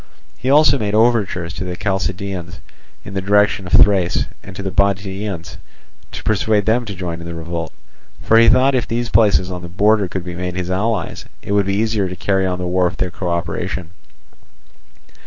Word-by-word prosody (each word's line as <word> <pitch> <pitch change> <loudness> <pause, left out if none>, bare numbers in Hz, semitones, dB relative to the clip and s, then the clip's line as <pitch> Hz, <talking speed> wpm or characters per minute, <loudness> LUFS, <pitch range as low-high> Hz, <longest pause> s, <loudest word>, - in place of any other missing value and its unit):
He 130 - -3
also 145 0 +5
made 105 -1 -1
overtures 105 -7 +1
to 95 - -5
the 90 -1 -4
Chalcidians 95 -3 -3 0.5
in - - -8
the 95 - -2
direction 100 -1 +2
of - - -9
Thrace, 95 -4 +4 0.2
and 95 - -11
to 100 - -6
the 95 - -3
Bottiaeans, 95 -3 -1 0.5
to - - -7
persuade 105 -1 +1
them 120 +2 +1
to 100 -3 -6
join 85 -2 -5
in 85 - -8
the 85 - -6
revolt; 85 0 -5 0.5
for 115 - +4
he 115 0 +6
thought 130 +4 +5
that 130 - +1
if 120 - -6
these 120 +1 -2
places 100 -5 +3
on 90 -1 -5
the 85 - -8
border 105 +2 +2
could 95 0 -5
be 90 0 -6
made 90 0 -4
his 90 0 -3
allies, 110 +5 -2 0.2
it - - -5
would 100 -1 +2
be 100 - 0
easier 105 -2 0
to 90 - -6
carry 95 +1 0
on 90 -1 -2
the 90 - -4
war 90 +1 +1
with 90 - -2
their 90 -1 -2
co 90 +1 -4
operation. 85 +1 -3
95 Hz, 205 wpm, -19 LUFS, 90-105 Hz, 0.5 s, he